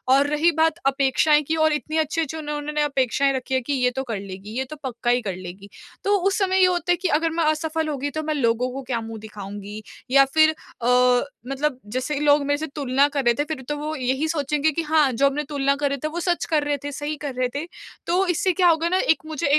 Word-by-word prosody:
और 280 +1 +3
रही 300 +3 +2
बात 320 -1 +2
अपेक्षाएँ 275 +2 +3
की 320 - 0
और 310 - +3
इतनी 310 +1 -3
अच्छी-अच्छी 320 0 -1
उन्होंने 300 0 -3
अपेक्षाएँ 275 -1 +1
रखी 260 0 -4
है 260 - +1
कि 285 +4 -3
ये 250 -1 +2
तो 265 - -2
कर 225 -5 -4
लेगी, 195 +1 -9
ये 265 - 0
तो 305 - -9
पक्का 240 -2 -3
ही 245 0 +2
कर 195 -4 -4
लेगी। 185 +2 -10 0.3
तो 405 +1 +3
उस 390 - +1
समय 380 -2 +2
ये 370 - +7
होता 355 -1 0
है - - +5
कि 370 +2 -1
अगर 320 0 +1
मैं 330 0 0
असफल 310 +1 0
हो 295 - -2
गई 285 +2 -2
तो 310 +1 -3
मैं 310 0 -1
लोगों 245 -3 +1
को 270 +1 -5
क्या 245 -2 -2
मुँह 225 0 -7
दिखाऊँगी? 205 0 -8 0.3
या 275 0 +7
फिर 315 +3 +4 0.3
अ, - - -3 0.6
मतलब 275 0 -2 0.2
जैसे 260 +4 -1
ही - - -2
लोग 290 0 +4
मेरे 285 0 +1
से 315 - -4
तुलना 275 -1 +2
कर 280 -1 -2
रहे 240 - +5
थे - - +3
फिर 280 - -7
तो 295 - -1
वो 305 +1 -4
यही 265 +3 -1
सोचेंगे 300 0 0
कि 330 - -2
हाँ, 305 -3 +3
जो 275 +4 +3
हमने 290 +2 -1
तुलना 280 -1 +1
कर 285 0 0
रहे 280 - -2
थे 310 - +1
वो 330 +3 -4
सच 350 0 0
कर 310 -3 +1
रहे 290 0 0
थे, 290 - -4
सही 295 +2 -4
कर 285 -2 -5
रहे 255 0 +1
थे। 295 +3 -2 0.4
तो 360 +3 +2
इससे 370 +2 +1
क्या 360 0 +3
होगा 330 +1 +2
ना 370 - +2
एक 320 - +2
मुझे 310 0 -2
290 Hz, 255 wpm, -23 LUFS, 260-315 Hz, 0.6 s, ये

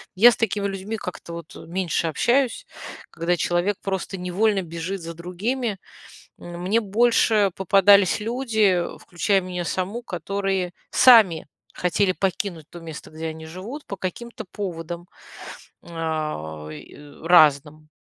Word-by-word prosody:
я 240 +6 +8
с - - -3
такими 205 -2 -1
людьми 195 +3 -4
как-то 175 -3 -7
вот 170 -1 -9
меньше 170 -1 -2
общаюсь, 260 - +1 0.5
когда 170 +1 0
человек 175 +5 0
просто 190 0 -3
невольно 190 +2 +1
бежит 170 +3 -5
за 165 0 -6
другими. 200 +6 -3 0.6
Мне 180 +6 -1
больше 215 -1 +3
попадались 195 +1 +5
люди, 220 -6 +1 0.2
включая 195 +3 0
меня 180 -1 -4
саму, 190 +7 -3
которые 190 -1 -2 0.2
сами 215 -12 +6 0.3
хотели 185 +2 +1
покинуть 185 -4 -3
то 175 - -10
место, 160 -2 -9
где 160 +1 -6
они 160 0 -8
живут, 205 - -8
по 200 - -6
каким-то 225 +5 -6
поводам, 175 -3 -5 0.8
а, 155 - -4
и 75 - -11 0.3
разным. 155 -2 +4
185 Hz, 125 wpm, -23 LUFS, 170-205 Hz, 0.8 s, я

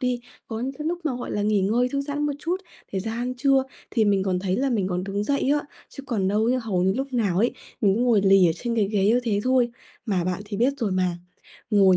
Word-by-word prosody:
đi, 250 -1 0 0.3
có 225 -1 -5
những 265 +2 -2
cái 300 +2 -6
lúc 345 +2 -1
mà, 265 -6 -1
gọi 245 - -5
là, 205 - -1
nghỉ 210 -1 +2
ngơi 230 +6 +2
thư 275 +2 -1
giãn 290 +1 -2
một 290 - 0
chút 340 +5 -1 0.4
thì 190 - -1
ra 220 +4 -4
ăn 245 +2 -2
trưa, 270 +1 +3 0.3
thì 225 - +2
mình 200 -2 +3
còn 185 -2 0
thấy 185 0 -1
là 270 +2 +1
mình 205 -6 0
còn 180 0 -2
đứng 200 +1 -2
dậy 280 0 +1
á, 295 0 +3 0.3
chứ 275 - -10
còn 195 -6 0
đâu 210 +2 +2
ấy 250 +2 +2
hầu 215 -7 -1
như 190 +1 +3
lúc 270 0 -3
nào 205 -7 +1
ấy, 235 +4 +3 0.3
mình 200 -3 +4
cứ 230 - -1
ngồi 240 -4 +4
lì 195 -2 +6
ở 165 - +3
trên 235 +3 -3
cái 205 -3 +2
ghế 200 -2 +1
như 235 +3 +4
thế 205 -3 +1
thôi, 255 -2 +3 0.4
mà 185 -5 0
bạn 185 +2 -2
thì 205 -1 -5
biết 250 +5 +3
rồi 210 -6 -1
mà, 185 -2 0 0.5
ngồi 195 -3 +5
220 Hz, 275 wpm, -24 LUFS, 195-255 Hz, 0.5 s, lì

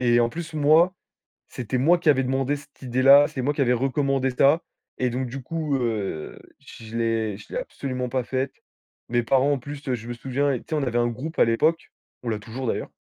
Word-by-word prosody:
Et 120 -1 +4
en 120 - +3
plus, 160 +1 -7
moi, 155 +5 +4 0.5
c'était 125 +1 -3
moi 165 +8 +4
qui 165 - +1
avais 135 -2 +4
demandé 135 +2 0
cette 140 0 -18
idée-là, 135 +3 +6
c'est 130 - -4
moi 145 +4 0
qui 145 - -2
avais 125 -2 +3
recommandé 135 +1 0
ça 140 +6 +4 0.4
et 125 -1 +1
donc, 125 +1 -2
du 135 +3 -6
coup, 155 0 -2
heu, 105 -10 -3 0.2
je 110 0 -11
l'ai 115 -3 0
je - - -13
l'ai - - -1
absolument 130 - -4
pas 130 0 -1
faite. 130 +2 -2 0.6
Mes 120 0 +2
parents, 135 +4 +3
en 135 - -1
plus, 145 +2 -9
heu, 130 - +1
je 115 0 -9
me - - -3
souviens, 135 +3 -1
tu - - -11
sais, 160 - -1
on 150 - 0
avait 120 -2 -1
un 120 0 +3
groupe 130 +8 -5
à - - +7
l'époque. 155 +9 +1 0.3
On 120 - -3
l'a 110 - -1
toujours 120 +4 -6
d'ailleurs - - -2
130 Hz, 225 wpm, -24 LUFS, 120-145 Hz, 0.6 s, à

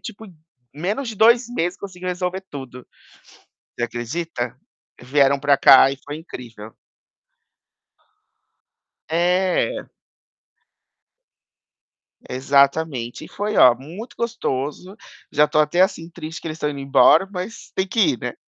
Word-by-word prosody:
Tipo, 220 -1 -9 0.5
menos 205 - -3
de 225 - -5
2 235 +3 +4
meses 175 -7 -2
conseguiu 185 -2 -7
resolver 180 +1 -3
tudo. 130 -3 -9 0.9
Você - - -4
acredita? 120 +2 -4 0.4
Vieram 140 +2 +2
para 140 0 +2
cá 135 0 +7
e 135 - -6
foi 145 - -5
incrível. 115 -9 -10 2.4
É. 180 - +1 2.4
Exatamente. 140 -1 +1
E - - -12
foi, 210 +1 -3
ó, 125 -2 +7
muito 170 - -10
gostoso. 185 - -3 0.4
Já 150 +1 +4
estou 155 0 +2
até, 155 +4 +1
assim, 185 -4 0
triste 160 -2 -8
que - - -6
eles 155 - -5
estão 150 - -1
indo 145 -1 -6
embora, 135 +6 +4
mas 185 +3 -7
têm 190 0 0
que 225 - -3
ir, 290 +7 +3
né. - - -4
160 Hz, 125 wpm, -21 LUFS, 135-190 Hz, 2.4 s, cá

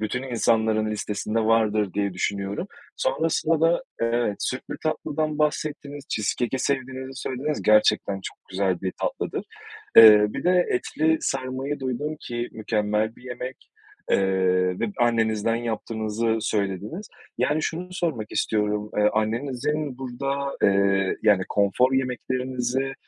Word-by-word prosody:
bütün 115 +4 -2
insanların 110 -3 +1
listesinde 105 +1 -2
vardır 110 -3 +2
diye 100 -1 0
düşünüyorum. 100 - -2 0.3
Sonrasında 165 - +1
da, 165 +8 +3
evet, 115 -3 0
sütlü 130 - -4
tatlıdan 155 -1 -2
bahsettiniz, 150 -1 -2
cheesecake'i 120 +4 -1
sevdiğinizi 130 0 -2
söylediniz, 140 +4 -3
gerçekten 105 -2 +3
çok - - -7
güzel 95 -2 0
bir 95 -1 -2
tatlıdır. - - -2 0.5
Eee, 105 -2 +10
bir - - -5
de 180 0 +4
etli 160 +5 +1
sarmayı 135 +2 -2
duydum 135 +4 -3
ki 120 0 -4
mükemmel 110 0 -1
bir - - -18
yemek, 125 0 -7 0.4
eee, 95 -1 +2
ve - - +1
annenizden 115 -2 +2
yaptığınızı 115 -1 -2
söylediniz. 105 - -2 0.3
Yani, 155 +1 +1
şunu 175 +3 -3
sormak 160 - -2
istiyorum, 105 -1 0
ııı, 105 0 +4
annenizin 130 +5 -1
burada, 135 +2 -3
eee, 100 -1 +3
yani, 105 -3 +4
konfor 105 +6 +2
yemeklerinizi, 130 0 -1
120 Hz, 120 wpm, -25 LUFS, 105-135 Hz, 0.5 s, Eee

